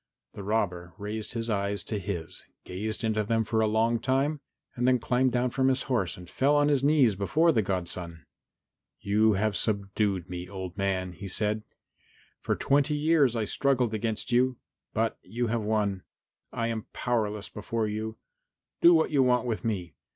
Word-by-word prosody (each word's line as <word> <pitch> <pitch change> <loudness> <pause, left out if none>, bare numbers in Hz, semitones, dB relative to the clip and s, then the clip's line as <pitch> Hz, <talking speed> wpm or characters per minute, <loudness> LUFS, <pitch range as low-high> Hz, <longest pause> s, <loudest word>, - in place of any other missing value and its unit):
The - - -8
robber 90 -4 -2
raised 105 +2 -5
his 115 -1 -2
eyes 100 -2 -1
to 105 - -3
his, 90 -4 -5 0.2
gazed 105 +5 -4
into 110 -1 +1
them 115 +2 +1
for 110 0 0
a 110 - +3
long 115 +2 +2
time, 135 +5 0 0.4
then 125 +1 +3
climbed 125 +2 +1
down 125 +1 0
from 130 +1 +1
his 135 0 +2
horse 115 - -1
and 90 0 -11
fell 140 +9 +2
on 145 0 +4
his 140 -2 +2
knees 140 -7 +4
before 155 - +3
the 115 - +2
godson. 90 -4 -4 0.7
"You 105 +2 +3
have 105 +1 0
subdued 100 -2 0
me, 90 0 -6
old 95 -2 -6
man," 95 -2 -1
he 95 +3 -8
said. 105 +3 +2 0.8
"For - - 0
twenty 145 +2 +2
years 150 -4 +3
I 110 -2 0
struggled 125 -1 +1
against 110 +2 -2
you, 125 +1 +3 0.3
but 115 0 -1
you 120 +2 -3
have 115 - 0
won. 105 -3 0 0.5
I 115 - -2
am 110 -2 -4
powerless 105 -4 -1
before 110 +1 -2
you. 110 +1 -4 0.6
Do 170 0 +8
what 160 0 +2
you 140 -3 +4
want 125 -1 +3
with 115 -3 -2
me. 100 -7 -2
110 Hz, 175 wpm, -28 LUFS, 100-125 Hz, 0.8 s, Do